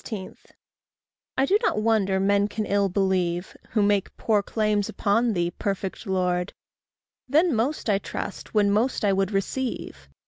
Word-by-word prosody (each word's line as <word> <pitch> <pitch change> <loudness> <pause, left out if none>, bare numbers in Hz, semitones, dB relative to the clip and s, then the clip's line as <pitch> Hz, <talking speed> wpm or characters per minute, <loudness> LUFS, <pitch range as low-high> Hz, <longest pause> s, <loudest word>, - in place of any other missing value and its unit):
I 270 - +4
do 400 +7 +3
not 320 - +1
wonder 200 -4 +2
men 200 +1 +3
can 210 +1 -3
ill 200 -1 +1
believe 185 -2 0 0.2
Who 215 -3 +3
make 205 -1 +1
poor 215 -2 +2
claims 210 -1 0
upon 225 +3 +1
thee, 175 -2 0
perfect 195 +2 -4
Lord; 180 -1 0 0.8
Then 315 +4 +4
most 245 +7 -1
I 200 -2 +3
trust 205 +2 -6
when 205 -1 +4
most 220 +2 +1
I 200 - +3
would 195 -1 +1
receive. 195 - -3
200 Hz, 145 wpm, -25 LUFS, 190-220 Hz, 0.8 s, I